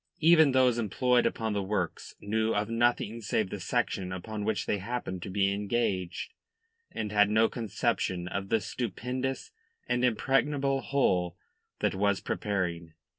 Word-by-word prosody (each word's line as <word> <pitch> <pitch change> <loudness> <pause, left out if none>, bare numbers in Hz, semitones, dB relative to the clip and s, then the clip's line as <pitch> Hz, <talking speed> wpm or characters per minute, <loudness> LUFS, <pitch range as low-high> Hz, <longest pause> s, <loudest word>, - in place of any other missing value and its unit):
Even 160 -2 +6
those 130 -2 +3
employed 125 +3 +2
upon 110 -2 -2
the 100 - 0
works 95 -3 -3
knew 110 +2 0
of 105 +2 -1
nothing 115 -1 +1
save 105 -2 -1
the 105 - -4
section 95 -2 -1
upon 105 +3 -5
which 105 -2 -1
they 105 - 0
happened 95 -3 -4
to 95 - -6
be 100 0 +1
engaged, 100 - -2 0.6
and 105 -2 -4
had 105 -1 +4
no 110 +1 +4
conception 95 -5 -1
of 95 +1 -4
the 115 - +3
stupendous 125 - -3 0.4
and 125 0 0
impregnable 135 +3 +1
whole 90 -12 +1 0.4
that - - +2
was 100 0 +1
preparing. 85 -5 -3
110 Hz, 145 wpm, -29 LUFS, 95-125 Hz, 0.6 s, Even